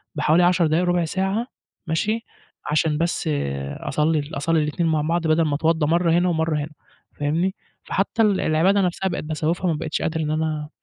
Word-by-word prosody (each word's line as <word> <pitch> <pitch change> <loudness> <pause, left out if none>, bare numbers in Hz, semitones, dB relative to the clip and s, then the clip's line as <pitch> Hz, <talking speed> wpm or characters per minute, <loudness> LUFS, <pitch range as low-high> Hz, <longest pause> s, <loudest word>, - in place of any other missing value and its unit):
بحوالي 165 +3 +3
10 175 -2 +3
دقايق 165 +4 +1
ربع 175 -1 +1
ساعة 195 +7 -1 0.4
ماشي، 215 +8 -1 0.5
عشان 150 0 +2
بس 170 -1 -1 0.5
أصلي 150 -1 0
أصلي 160 +3 +1
الإتنين 165 +3 -1
مع 155 -1 +1
بعض 165 +2 0
بدل 160 +1 +3
ما 145 -2 0
اتوضا 160 0 +1
مرّة 170 +1 +2
هنا 175 +2 +3
ومرّة 160 -2 0
هنا 150 +2 -5 0.5
فاهمني؟ 165 +6 0 0.3
فحتى 200 +3 -1
ال 205 -3 +3
العبادة 185 +6 +3
نفسها 185 +1 0
بقيت 170 - -4
باسوّفها 160 +4 -1
ما 160 - +1
بقيتش 155 - -3
قادر 160 0 -1
إن 155 0 -1
أنا 155 -1 -2
165 Hz, 175 wpm, -22 LUFS, 155-180 Hz, 0.5 s, بحوالي